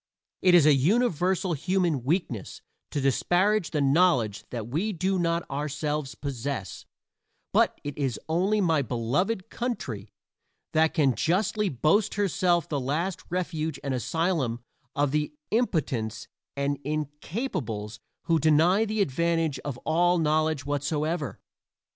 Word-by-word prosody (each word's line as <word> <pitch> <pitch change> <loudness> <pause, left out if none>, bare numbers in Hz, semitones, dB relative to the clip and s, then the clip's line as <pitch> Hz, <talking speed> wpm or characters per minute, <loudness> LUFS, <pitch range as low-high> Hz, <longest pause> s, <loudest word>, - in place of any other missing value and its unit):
It 180 -1 +6
is 165 -4 +7
a 150 - +7
universal 185 - +2
human 170 -3 0
weakness 135 - -2 0.3
to 145 - -2
disparage 175 +9 +2
the 150 - -1
knowledge 135 - +3
that 115 -3 -5
we 175 - -1
do 185 +2 0
not 170 0 0
ourselves 145 0 -3
possess, 135 -6 -5 0.7
but - - +3
it 145 +1 -6
is 135 -6 -1
only 190 +6 +2
my 165 -5 +3
own 135 - -3
beloved 150 - -1
country 125 - -4 0.6
that 160 0 +3
can 140 -6 +3
justly 195 - +1
boast 165 - +2
herself 180 -4 +1
the 145 - -1
last 160 +8 -2
refuge 160 -4 -2
and 140 - -1
asylum 135 -2 -1 0.3
of 145 -1 +1
the 150 - -1 0.2
impotents 135 - 0 0.3
and 140 0 -1
incapables 145 - -4 0.2
who 165 -1 +2
deny 160 +8 +4
the 215 -1 -1
advantage 165 0 0
of 140 -3 -5
all 175 +2 +3
knowledge 155 -2 +1
whatsoever. 150 +1 -2
155 Hz, 130 wpm, -27 LUFS, 140-180 Hz, 0.7 s, is